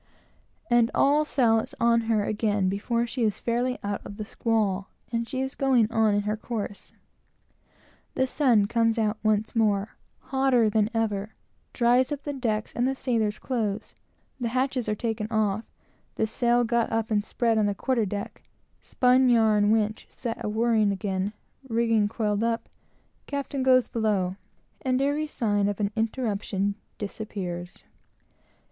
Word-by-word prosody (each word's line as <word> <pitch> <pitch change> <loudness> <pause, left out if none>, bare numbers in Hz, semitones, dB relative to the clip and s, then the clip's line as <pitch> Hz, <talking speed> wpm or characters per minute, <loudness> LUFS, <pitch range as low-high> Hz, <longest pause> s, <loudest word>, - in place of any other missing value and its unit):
and 240 -4 +4
all 290 +2 +4
sail 240 -7 +3
is 270 +5 -6
on 235 0 +4
her 215 -2 +2
again 210 -3 0
before 230 +5 0
she 245 +2 -4
is 215 -3 +1
fairly 245 +2 -1
out 205 0 -3
of 200 - -9
the 215 - -5
squall; 205 -4 0 0.2
and 230 0 -2
she 260 - -2
is 265 +1 -3
going 260 -5 +3
on 220 -2 +3
in 205 - +2
her 210 +1 -1
course. 215 -2 -6 1.2
The 260 - +2
sun 250 -6 +3
comes 230 +1 +1
out 215 -1 0
once 215 0 0
more, 210 -2 +1 0.2
hotter 260 -5 +2
than 215 0 +2
ever, 215 -2 -2 0.4
dries 245 +2 +3
up 290 -1 -4
the 290 - -3
decks 220 -5 -2
and 240 +2 +1
the 270 - 0
sailors' 225 -5 0
clothes; 220 -5 -3 0.5
the 240 - -1
hatches 255 0 -1
are 210 - 0
taken 220 -1 -2
off; 220 -1 0 0.5
the 220 - +1
sail 240 +2 +2
got 235 0 0
up 225 0 -1
and 205 -1 +2
spread 225 0 +1
on 210 - +2
the 205 - -1
quarter 250 +1 0
deck; 200 +1 -5 0.4
spun 255 0 +3
yarn 215 -3 +4
winch 215 -1 0
set 230 -2 -5
a - - -1
whirling 220 -1 +2
again; 195 0 -2 0.4
rigging 225 -2 +2
coiled 210 -1 -1
up; 230 0 -1 0.6
captain 280 -1 -3
goes 255 -1 +4
below; 205 -5 0 0.5
and 255 -1 +1
every 290 +3 0
sign 205 -7 0
of 205 0 -2
an 205 -1 0
interruption 210 -4 -1 0.3
is 205 +1 -6
removed. 175 -3 -6
225 Hz, 160 wpm, -26 LUFS, 210-245 Hz, 1.2 s, and